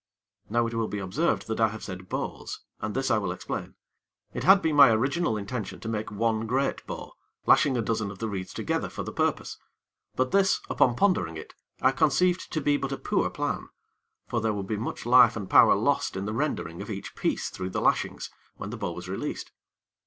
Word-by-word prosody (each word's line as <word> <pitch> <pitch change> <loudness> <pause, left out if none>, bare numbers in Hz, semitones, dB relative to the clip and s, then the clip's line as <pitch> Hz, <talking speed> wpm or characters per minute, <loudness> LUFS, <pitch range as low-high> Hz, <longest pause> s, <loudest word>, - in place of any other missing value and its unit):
Now, 120 +2 +2
it 115 - -4
will 115 -1 0
be 105 - -4
observed 100 - 0
that 110 0 -3
I 110 - +5
have 110 0 -7
said 95 -1 -8
bows, - - -4 0.2
and 110 - -4
this 135 0 0
I 110 - +4
will 95 -4 -2
explain. 90 - -5 0.6
It - - -4
had 195 +1 +7
been 160 -5 0
my 140 -3 +9
original 130 +3 +1
intention 105 +2 -5
to - - -6
make 110 0 -2
one 110 +1 0
great 135 +4 0
bow, - - -7 0.3
lashing 140 -4 +4
a 115 - 0
dozen 110 -2 -1
of 95 - -9
the 115 - -3
reeds 95 -3 -5
together - - -2
for - - -5
the - - -6
purpose; - - -1 0.6
but 130 0 0
this, 195 -1 +3
upon 120 - +3
pondering 105 - +1
it, 80 - -10 0.3
I 130 - +6
conceived 175 +5 +2
to 155 - -1
be 145 0 +2
but 135 -1 -4
a 135 - -2
poor - - 0
plan; - - -3 0.6
for 120 - -1
there 110 0 +1
would 100 -2 -4
be 110 - -2
much 110 +2 -5
life 125 -1 +6
and 100 -4 -5
power - - +7
lost - - 0
in 95 - -3
the 105 - -3
rendering 115 - -2
of - - -7
each - - -6
piece - - -1
through 95 0 -5
the - - -2
lashings, - - 0 0.2
when 100 - -7
the 120 - -5
bow 100 -5 -3
was 90 +1 -8
released. 95 - -4
115 Hz, 215 wpm, -27 LUFS, 100-135 Hz, 0.6 s, my